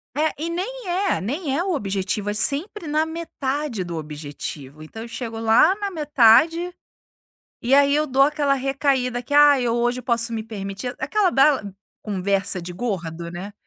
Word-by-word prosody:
É, 310 Hz, +1 st, +1 dB
e 330 Hz, -, -2 dB
nem 405 Hz, +6 st, -5 dB
é, 375 Hz, +2 st, 0 dB
nem 275 Hz, -, -2 dB
é 340 Hz, -, 0 dB
o 375 Hz, -1 st, -1 dB
objetivo, 200 Hz, -2 st, -2 dB
é -, -, -1 dB
sempre 300 Hz, -, 0 dB
na 305 Hz, +1 st, +1 dB
metade 295 Hz, -, -3 dB
do 170 Hz, -2 st, -5 dB
objetivo. 150 Hz, -1 st, -7 dB
Então 220 Hz, +8 st, -10 dB
eu -, -, -8 dB
chego 230 Hz, -1 st, -6 dB
lá 225 Hz, -, +4 dB
na 405 Hz, -1 st, -3 dB
metade 315 Hz, +3 st, +4 dB, 0.9 s
e 250 Hz, +3 st, +3 dB
aí 280 Hz, 0 st, +5 dB
eu 305 Hz, +1 st, +1 dB
dou 270 Hz, 0 st, +3 dB
aquela 285 Hz, -1 st, +2 dB
recaída, 265 Hz, -2 st, 0 dB
que: 290 Hz, -, -10 dB
"Ai, 290 Hz, -3 st, +6 dB
eu 235 Hz, -1 st, +1 dB
hoje 240 Hz, +1 st, 0 dB
posso 235 Hz, -1 st, 0 dB
me 225 Hz, -1 st, -3 dB
permitir". 205 Hz, +2 st, -6 dB
Aquela 370 Hz, +8 st, +1 dB
bela 275 Hz, -4 st, +4 dB, 0.4 s
conversa 195 Hz, -2 st, -1 dB
de 175 Hz, +1 st, -7 dB
gordo, 170 Hz, -5 st, -4 dB
né: 180 Hz, +4 st, -7 dB
255 Hz, 170 wpm, -22 LUFS, 205-300 Hz, 0.9 s, Ai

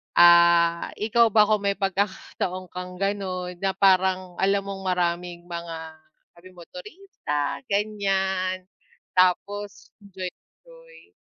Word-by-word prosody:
Ah, 170 Hz, -1 st, +6 dB
ikaw 230 Hz, +2 st, +3 dB
ba, 215 Hz, -1 st, +5 dB
kung 210 Hz, 0 st, +2 dB
may 200 Hz, -, +1 dB
pagkakataon 190 Hz, -2 st, -3 dB
kang 180 Hz, 0 st, -7 dB
gano'n 185 Hz, -2 st, -3 dB
na 195 Hz, -1 st, -1 dB
parang 185 Hz, -1 st, +2 dB
alam 195 Hz, +1 st, +2 dB
mong 195 Hz, -1 st, -6 dB
maraming 175 Hz, -1 st, -1 dB
mga 170 Hz, -1 st, -6 dB, 0.6 s
daming 185 Hz, +1 st, -16 dB, 0.2 s
turista 180 Hz, -, -5 dB
ganyan, 195 Hz, -2 st, -1 dB, 0.5 s
tapos, 200 Hz, +3 st, 0 dB
enjoy-enjoy. 430 Hz, -, -12 dB
190 Hz, 100 wpm, -24 LUFS, 180-200 Hz, 0.6 s, Ah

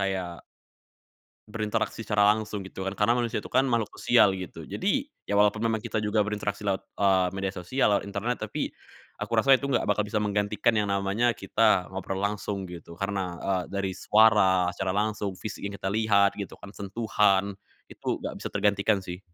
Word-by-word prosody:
kayak 95 Hz, -3 st, -3 dB, 1.1 s
berinteraksi 110 Hz, +1 st, -2 dB
secara 105 Hz, -1 st, +3 dB
langsung 105 Hz, -3 st, -5 dB
gitu 95 Hz, 0 st, -7 dB
kan. 95 Hz, +1 st, -3 dB
Karena 105 Hz, +3 st, +3 dB
manusia 120 Hz, -2 st, -1 dB
itu -, -, -9 dB
kan 130 Hz, -, +3 dB
makhluk 115 Hz, -3 st, +1 dB
sosial 105 Hz, -5 st, +4 dB
gitu. 85 Hz, -4 st, -8 dB
Jadi, 205 Hz, -, -1 dB, 0.2 s
ya 100 Hz, -, 0 dB
walaupun 105 Hz, 0 st, +3 dB
memang 115 Hz, -1 st, +1 dB
kita 120 Hz, -2 st, -3 dB
juga 105 Hz, +1 st, +1 dB
berinteraksi 105 Hz, -1 st, -3 dB
lewat, 95 Hz, -1 st, 0 dB, 0.2 s
eee, 95 Hz, -2 st, +4 dB
media 95 Hz, 0 st, -3 dB
sosial, 95 Hz, +10 st, +1 dB
lewat -, -, 0 dB
internet. 100 Hz, +5 st, -2 dB
Tapi, -, -, -3 dB, 0.5 s
aku -, -, -4 dB
rasa 135 Hz, 0 st, +6 dB
itu 140 Hz, -, -5 dB
nggak 120 Hz, -, +1 dB
bakal 105 Hz, 0 st, +2 dB
bisa 105 Hz, +1 st, -1 dB
menggantikan 105 Hz, +2 st, +1 dB
yang 105 Hz, -1 st, 0 dB
namanya 100 Hz, +5 st, +1 dB
kita 95 Hz, -1 st, +2 dB
ngobrol 95 Hz, 0 st, -4 dB
langsung 100 Hz, -1 st, -2 dB
gitu. 85 Hz, -1 st, -10 dB
Karena, 95 Hz, -3 st, -2 dB
eee, 95 Hz, -2 st, 0 dB
dari 100 Hz, -1 st, -2 dB
suara 95 Hz, -5 st, +4 dB
secara 95 Hz, +1 st, -1 dB
langsung, 105 Hz, -1 st, -1 dB
fisik 105 Hz, +3 st, -7 dB
yang 100 Hz, -, -4 dB
kita 95 Hz, -, -2 dB
lihat 100 Hz, -1 st, +3 dB
gitu 100 Hz, -, -5 dB
kan, 100 Hz, -, -10 dB
sentuhan, 100 Hz, -1 st, +1 dB, 0.3 s
itu -, -, -3 dB
nggak -, -, -5 dB
bisa -, -, -5 dB
tergantikan 100 Hz, 0 st, +2 dB
sih. 90 Hz, -1 st, -7 dB
100 Hz, 180 wpm, -27 LUFS, 95-110 Hz, 1.1 s, rasa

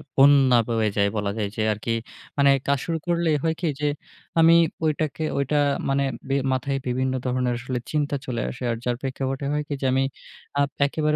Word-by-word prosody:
বন্যা 135 Hz, -2 st, +6 dB
বয়ে 115 Hz, -2 st, +1 dB
যায়। 100 Hz, 0 st, +3 dB
বলা 100 Hz, -1 st, -1 dB
যায় 105 Hz, -2 st, -1 dB
যে, 110 Hz, -, -2 dB
আরকি 115 Hz, +2 st, -3 dB, 0.4 s
মানে 140 Hz, 0 st, +5 dB, 0.2 s
কাজ 140 Hz, -1 st, +2 dB
শুরু 165 Hz, -1 st, -1 dB
করলে 170 Hz, -1 st, +1 dB
হয় 160 Hz, 0 st, +1 dB
কি 170 Hz, -, 0 dB
যে, 150 Hz, -, +2 dB, 0.5 s
আমি 165 Hz, +1 st, +7 dB, 0.3 s
ঐটাকে 155 Hz, 0 st, -1 dB, 0.2 s
ঐটা 140 Hz, +2 st, +1 dB, 0.3 s
মানে 140 Hz, 0 st, +2 dB, 0.3 s
বি 135 Hz, -, +2 dB, 0.2 s
মাথায় 135 Hz, +2 st, -1 dB
বিভিন্ন 130 Hz, +1 st, 0 dB
ধরণের 125 Hz, -1 st, 0 dB
আসলে 125 Hz, 0 st, -3 dB
চিন্তা 145 Hz, -1 st, 0 dB
চলে 120 Hz, -3 st, -2 dB
আসে। 125 Hz, -, -8 dB
আর 115 Hz, -, -2 dB
যার 125 Hz, -, +1 dB
প্রেক্ষাপটে 135 Hz, 0 st, -3 dB
হয় 150 Hz, 0 st, 0 dB
কি, 145 Hz, -, -3 dB
যে -, -, -1 dB
আমি 135 Hz, -, +3 dB, 0.6 s
আ -, -, +5 dB, 0.2 s
একেবারে 150 Hz, +1 st, 0 dB
135 Hz, 190 wpm, -24 LUFS, 125-150 Hz, 0.6 s, আমি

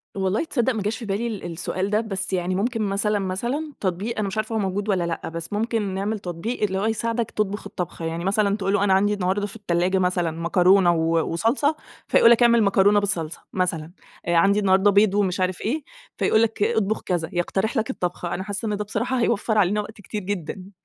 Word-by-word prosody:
والله 190 Hz, +4 st, 0 dB
تصدق 260 Hz, -7 st, 0 dB
ما 215 Hz, -, -3 dB
جاش 210 Hz, +3 st, -2 dB
في 235 Hz, -, -7 dB
بالي 210 Hz, +4 st, -1 dB
ال 215 Hz, -4 st, -5 dB
السؤال 185 Hz, +3 st, -3 dB
ده، 210 Hz, +1 st, +2 dB
بس 195 Hz, -3 st, -4 dB
يعني 185 Hz, 0 st, 0 dB
ممكن 225 Hz, +3 st, -1 dB
مثلًا 205 Hz, +1 st, 0 dB
مثلًا 240 Hz, +11 st, -3 dB
تطبيق 200 Hz, +5 st, -2 dB
أنا 205 Hz, -, 0 dB
مش 195 Hz, -, -5 dB
عارفة 220 Hz, +1 st, -2 dB
هو -, -, +1 dB
موجود 200 Hz, +2 st, -2 dB
والّا 185 Hz, -3 st, +2 dB
لأ، 170 Hz, -1 st, -3 dB
بس 165 Hz, +4 st, -6 dB
ممكن 215 Hz, -2 st, -1 dB
نعمل 205 Hz, +3 st, -2 dB
تطبيق 190 Hz, +6 st, -4 dB
اللي 190 Hz, -2 st, 0 dB
هو 205 Hz, -, -1 dB
يساعدك 230 Hz, +1 st, -1 dB
تطبخ 205 Hz, -1 st, -2 dB
الطبخة. 175 Hz, -3 st, -5 dB
يعني 165 Hz, +2 st, -3 dB
مثلًا 200 Hz, +1 st, +2 dB
تقول 195 Hz, -1 st, -1 dB
له 205 Hz, -, +2 dB
أنا 200 Hz, -2 st, +3 dB
عندي 205 Hz, +2 st, +3 dB
النهارده 200 Hz, +1 st, -1 dB
في 205 Hz, -, -11 dB
التلاجة 185 Hz, -2 st, 0 dB
مثلًا 180 Hz, -2 st, +1 dB
مكرونة 175 Hz, +2 st, +4 dB
و 165 Hz, 0 st, +1 dB
وصلصة 255 Hz, -, +1 dB, 0.3 s
فيقول 230 Hz, -, +6 dB
لك 235 Hz, +1 st, +5 dB
اعمل 235 Hz, -1 st, +5 dB
مكرونة 200 Hz, +1 st, +4 dB
بالصلصة 175 Hz, -6 st, -2 dB
مثلًا، 170 Hz, -4 st, -1 dB, 0.4 s
آآ 170 Hz, -, +2 dB
عندي 200 Hz, +5 st, +4 dB
النهارده 195 Hz, 0 st, +4 dB
بيض 200 Hz, 0 st, +4 dB
ومش 195 Hz, -2 st, +1 dB
عارف 185 Hz, -1 st, -1 dB
إيه، 290 Hz, +8 st, -2 dB, 0.3 s
فيقول 220 Hz, -, +3 dB
لك 225 Hz, -2 st, +1 dB
اطبخ 220 Hz, -1 st, 0 dB
كذا، 170 Hz, -3 st, -2 dB
يقترح 190 Hz, +7 st, -1 dB
لك 225 Hz, +4 st, 0 dB
الطبخة. 180 Hz, -6 st, -3 dB
أنا 190 Hz, -, -3 dB
حاسة 205 Hz, +3 st, -4 dB
إن 210 Hz, -1 st, -1 dB
ده 210 Hz, -, -2 dB
بصراحة 245 Hz, +5 st, -2 dB
هيوفّر 220 Hz, -1 st, +1 dB
علينا 205 Hz, +1 st, +3 dB
وقت 210 Hz, 0 st, -11 dB
كتير 210 Hz, +1 st, -5 dB
جدًا. 190 Hz, 0 st, -5 dB
200 Hz, 215 wpm, -23 LUFS, 185-220 Hz, 0.4 s, فيقول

